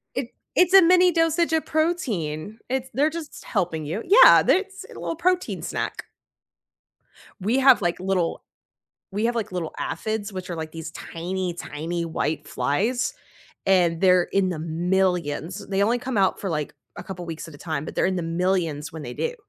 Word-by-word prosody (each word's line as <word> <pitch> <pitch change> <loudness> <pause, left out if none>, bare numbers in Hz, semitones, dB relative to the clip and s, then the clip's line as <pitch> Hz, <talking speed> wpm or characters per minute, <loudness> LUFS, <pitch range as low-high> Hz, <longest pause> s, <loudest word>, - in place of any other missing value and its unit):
It 255 -2 -4 0.2
it's 365 +1 +4
a 385 - +10
mini 360 +1 +5
dosage 330 0 +2
of 320 - +1
protein, 220 - -1
it 260 0 -2
they're 295 +3 +3
just 330 -2 -8
helping 160 -3 -1
you. 170 +10 -3
Yeah, 420 +7 +8
they're - - +4
It's 390 0 -8
a - - -11
little 330 - -3
protein 365 +1 0
snack. - - -4 1.4
We 225 +8 +1
have, 265 -5 +6
like, 175 0 -1
little 185 -3 -1 0.7
we 205 +3 -2
have, 240 0 0
like, 220 -5 -2
little 170 -3 -3
aphids, 210 +5 -3
which 185 -1 -6
are, 170 - -3
like, 160 0 -6
these 160 -1 -7
tiny, 180 +2 -4
tiny 170 +1 -4
white 155 -2 -2
flies, 235 - 0 0.5
and 175 -3 +3
they're 180 -2 +5
in 195 -1 +2
the 165 -4 -3
millions. 170 -1 -1
They 195 0 0
only 235 +4 +2
come 255 -2 -4
out 190 -1 +2
for, 195 - -3
like, 150 -3 -2 0.2
a - - -6
couple 180 -2 -7
weeks 165 0 -6
at 150 - -12
a - - -12
time, 155 -3 -3
but - - -8
they're - - +3
in 190 - 0
the 180 - -2
millions 165 -3 -1
when 160 -2 -7
they - - -7
do, 480 0 -2
190 Hz, 190 wpm, -24 LUFS, 165-260 Hz, 1.4 s, a